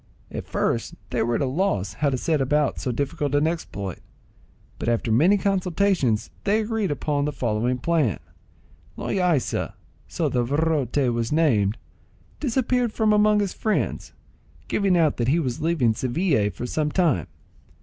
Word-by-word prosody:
At -, -, -6 dB
first -, -, -1 dB, 0.2 s
they -, -, 0 dB
were 120 Hz, +1 st, +1 dB
at -, -, 0 dB
a -, -, +2 dB
loss 135 Hz, -, -1 dB
how 150 Hz, -, 0 dB
to 130 Hz, -, -1 dB
set 155 Hz, +2 st, 0 dB
about 145 Hz, +2 st, +1 dB
so 125 Hz, -, -2 dB
difficult 140 Hz, +2 st, -2 dB
an 145 Hz, +1 st, +3 dB
exploit; 100 Hz, -, -4 dB, 0.8 s
but -, -, -1 dB
after 115 Hz, -1 st, 0 dB
many 165 Hz, -, +5 dB
consultations 185 Hz, -, +1 dB
they 205 Hz, +2 st, +2 dB
agreed 220 Hz, -3 st, -1 dB
upon 145 Hz, 0 st, -1 dB
the 150 Hz, -, -1 dB
following 125 Hz, -1 st, -1 dB
plan:—Loaysa 165 Hz, -, -2 dB, 0.3 s
(so -, -, -1 dB
the 125 Hz, -, +1 dB
virote 145 Hz, 0 st, 0 dB, 0.2 s
was 115 Hz, -1 st, -2 dB
named) 120 Hz, -10 st, +2 dB, 0.6 s
disappeared 250 Hz, -3 st, +1 dB
from 215 Hz, -1 st, +2 dB
among 210 Hz, 0 st, +4 dB
his 200 Hz, -3 st, -2 dB
friends, 215 Hz, -1 st, -2 dB, 0.5 s
giving 195 Hz, -3 st, +2 dB
out 160 Hz, -3 st, +2 dB
that 120 Hz, -, 0 dB
he 145 Hz, +6 st, +3 dB
was 130 Hz, -7 st, -2 dB
leaving 155 Hz, -8 st, +2 dB
Seville 130 Hz, -, +1 dB
for 120 Hz, -, -6 dB
some 150 Hz, +4 st, -1 dB
time. 150 Hz, -, +1 dB
150 Hz, 150 wpm, -24 LUFS, 125-185 Hz, 0.8 s, many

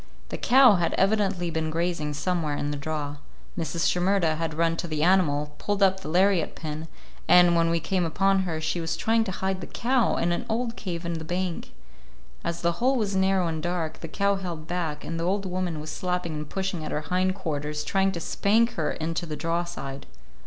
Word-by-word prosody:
The -, -, -4 dB
cow 255 Hz, -5 st, +6 dB
had 170 Hz, -1 st, 0 dB
evidently 195 Hz, -3 st, +1 dB
been 160 Hz, -1 st, -1 dB
grazing 160 Hz, -2 st, -1 dB
somewhere 160 Hz, -2 st, -1 dB
in 145 Hz, -, -2 dB
the -, -, -2 dB
draw. 145 Hz, 0 st, -4 dB, 0.4 s
Mrs. 165 Hz, 0 st, -1 dB
Shimerda 180 Hz, -3 st, +2 dB
had 165 Hz, -1 st, -2 dB
run 165 Hz, 0 st, +2 dB
to 175 Hz, -, -3 dB
the 155 Hz, -2 st, -1 dB
animal, 150 Hz, -5 st, +2 dB
pulled 205 Hz, -1 st, 0 dB
up 190 Hz, 0 st, +4 dB
the 190 Hz, -, -8 dB
lariat 185 Hz, 0 st, +2 dB
pin, 155 Hz, 0 st, -5 dB, 0.4 s
and, 175 Hz, -1 st, +7 dB
when 165 Hz, 0 st, +3 dB
we 170 Hz, 0 st, +2 dB
came 180 Hz, +3 st, 0 dB
upon 195 Hz, +4 st, +2 dB
her, 175 Hz, -4 st, -2 dB
she 160 Hz, +2 st, -1 dB
was 165 Hz, 0 st, -2 dB
trying 225 Hz, 0 st, +2 dB
to 190 Hz, -, -3 dB
hide 190 Hz, 0 st, -2 dB
the -, -, -6 dB
cow 245 Hz, -1 st, +1 dB
in 175 Hz, -, +1 dB
an 175 Hz, -, -2 dB
old 230 Hz, +1 st, -1 dB
cave 175 Hz, -6 st, -5 dB
in 170 Hz, -1 st, -2 dB
the -, -, -7 dB
bank. 175 Hz, +1 st, -3 dB, 0.7 s
As 170 Hz, 0 st, -3 dB
the 170 Hz, -, +3 dB
hole 260 Hz, +2 st, +3 dB
was 210 Hz, -5 st, -1 dB
narrow 190 Hz, -1 st, +2 dB
and 160 Hz, -2 st, -2 dB
dark, 170 Hz, -2 st, -2 dB
the 165 Hz, -, -6 dB
cow 200 Hz, +4 st, +1 dB
held 170 Hz, -5 st, -5 dB
back, 160 Hz, -3 st, -3 dB
and 165 Hz, 0 st, -4 dB
the -, -, -1 dB
old 195 Hz, +3 st, 0 dB
woman 180 Hz, -3 st, -2 dB
was 155 Hz, +1 st, -6 dB
slapping 180 Hz, -3 st, -2 dB
and 150 Hz, -1 st, -5 dB
pushing 190 Hz, -4 st, -3 dB
at 155 Hz, -, -5 dB
her 150 Hz, -, -1 dB
hind 185 Hz, +3 st, 0 dB
quarters, 150 Hz, -4 st, -3 dB
trying 195 Hz, +2 st, +1 dB
to 170 Hz, -, -4 dB
spank 225 Hz, +7 st, +2 dB
her 160 Hz, -8 st, -1 dB
into 165 Hz, +2 st, -3 dB
the 155 Hz, -, -4 dB
draw 165 Hz, +3 st, -1 dB
side. 140 Hz, -5 st, -7 dB
175 Hz, 215 wpm, -26 LUFS, 160-190 Hz, 0.7 s, and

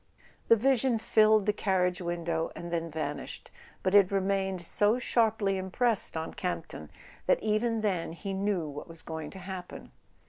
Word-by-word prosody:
The 230 Hz, -, +7 dB
vision 255 Hz, +1 st, +2 dB
filled 215 Hz, -1 st, +4 dB
the 210 Hz, -, +2 dB
carriage 185 Hz, -3 st, 0 dB
window 170 Hz, -1 st, -2 dB
and 170 Hz, 0 st, -7 dB
then 165 Hz, 0 st, -1 dB
van¬ 150 Hz, -2 st, -3 dB
ished; -, -, -9 dB, 0.3 s
but 185 Hz, -, +1 dB
it 200 Hz, -2 st, +6 dB
remained 195 Hz, -1 st, 0 dB
so 210 Hz, +6 st, +2 dB
sharply 220 Hz, -5 st, +1 dB
impressed 200 Hz, +1 st, 0 dB
on 160 Hz, -, -4 dB
Camp 180 Hz, -3 st, -3 dB
ton 75 Hz, -, -8 dB, 0.4 s
that -, -, +5 dB
even 220 Hz, +1 st, +1 dB
then 185 Hz, -6 st, -1 dB
he 195 Hz, +3 st, -5 dB
knew 195 Hz, -4 st, -1 dB
what 145 Hz, 0 st, -7 dB
was 165 Hz, -1 st, -9 dB
going 160 Hz, -2 st, -6 dB
to -, -, -11 dB
happen. 185 Hz, -1 st, -8 dB
190 Hz, 170 wpm, -29 LUFS, 170-215 Hz, 0.4 s, The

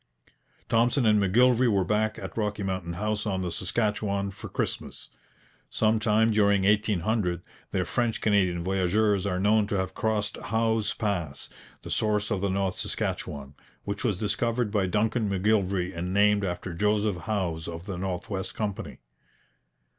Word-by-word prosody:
Thompson 120 Hz, +3 st, +2 dB
and 105 Hz, -1 st, +5 dB
M'Gillivray 120 Hz, +5 st, +4 dB
were 100 Hz, -2 st, +2 dB
back 110 Hz, +3 st, 0 dB
at -, -, -7 dB
Rocky 105 Hz, -2 st, -2 dB
Mountain 95 Hz, -3 st, -3 dB
House 105 Hz, +3 st, -2 dB
on 95 Hz, -2 st, -1 dB
the 90 Hz, -, -2 dB
Saskatchewan 100 Hz, 0 st, -1 dB
for -, -, -9 dB
Christmas. -, -, -4 dB, 0.6 s
Some 110 Hz, 0 st, +2 dB
time 110 Hz, +1 st, +3 dB
during 100 Hz, -2 st, +3 dB
1800 105 Hz, -3 st, +1 dB, 0.3 s
their 90 Hz, -2 st, -1 dB
French 120 Hz, +4 st, 0 dB
Canadian 95 Hz, -5 st, +2 dB
voyageurs 95 Hz, +2 st, +1 dB
are 90 Hz, -2 st, -1 dB
known 105 Hz, +2 st, +3 dB
to 105 Hz, -2 st, -1 dB
have 95 Hz, 0 st, -2 dB
crossed 105 Hz, -1 st, -1 dB
Howse 110 Hz, 0 st, 0 dB
Pass, 85 Hz, -10 st, -3 dB, 0.3 s
the -, -, -7 dB
source 105 Hz, 0 st, 0 dB
of 100 Hz, -3 st, 0 dB
the 100 Hz, -, 0 dB
North 95 Hz, -1 st, -1 dB
Saskatchewan, 70 Hz, -1 st, -3 dB, 0.3 s
which 100 Hz, 0 st, -4 dB
was 110 Hz, -7 st, +1 dB
discovered 115 Hz, +2 st, 0 dB
by 100 Hz, -3 st, +1 dB
Duncan 110 Hz, +2 st, +1 dB
M'Gillivray 95 Hz, -2 st, +1 dB
and 90 Hz, +2 st, -3 dB
named 105 Hz, +1 st, +3 dB
after 90 Hz, -1 st, -3 dB
Joseph 105 Hz, 0 st, 0 dB
Howse 90 Hz, -7 st, -1 dB
of 85 Hz, +1 st, -7 dB
the 95 Hz, -4 st, -5 dB
North 90 Hz, -1 st, -3 dB
West 95 Hz, -2 st, -4 dB
Company. 105 Hz, -3 st, -4 dB
100 Hz, 155 wpm, -27 LUFS, 95-110 Hz, 0.6 s, and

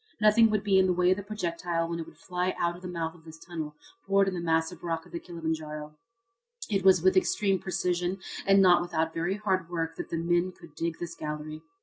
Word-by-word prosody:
Nothing 215 Hz, +1 st, +6 dB
would 215 Hz, -1 st, 0 dB
be 195 Hz, -2 st, +4 dB
in 190 Hz, -, +4 dB
the 180 Hz, -, +3 dB
way 180 Hz, +1 st, +3 dB
of 185 Hz, -, +3 dB
the -, -, -3 dB
projectile 175 Hz, -4 st, -2 dB
when 170 Hz, 0 st, -3 dB
it 165 Hz, -, -5 dB
would -, -, -15 dB
fly 180 Hz, 0 st, -2 dB
out 170 Hz, 0 st, 0 dB
of 175 Hz, -, -12 dB
the 185 Hz, -, -6 dB
mouth 165 Hz, -2 st, -3 dB
of 170 Hz, -3 st, -18 dB
this 160 Hz, 0 st, -11 dB
tunnel 160 Hz, -3 st, -6 dB, 0.3 s
bored 195 Hz, 0 st, +4 dB
in 190 Hz, -, 0 dB
the 180 Hz, -, -3 dB
massive 165 Hz, 0 st, 0 dB
rock 165 Hz, -1 st, -2 dB
of -, -, -17 dB
Kilimanjaro. 155 Hz, -3 st, -5 dB, 0.8 s
It 195 Hz, -2 st, +1 dB
was 185 Hz, -3 st, +6 dB
with 185 Hz, 0 st, +5 dB
extreme 195 Hz, +1 st, +2 dB
precision 180 Hz, 0 st, -1 dB, 0.3 s
and 195 Hz, 0 st, +6 dB
not 180 Hz, -2 st, +6 dB
without 165 Hz, -2 st, -1 dB
very 170 Hz, +3 st, -1 dB
hard 190 Hz, -5 st, 0 dB
work 165 Hz, -2 st, -3 dB
that -, -, -5 dB
the 165 Hz, -, -2 dB
men 175 Hz, +2 st, +1 dB
could 170 Hz, -4 st, -15 dB
dig 165 Hz, 0 st, -3 dB
this 170 Hz, -1 st, -5 dB
gallery. 155 Hz, 0 st, -5 dB
175 Hz, 230 wpm, -28 LUFS, 165-185 Hz, 0.8 s, Nothing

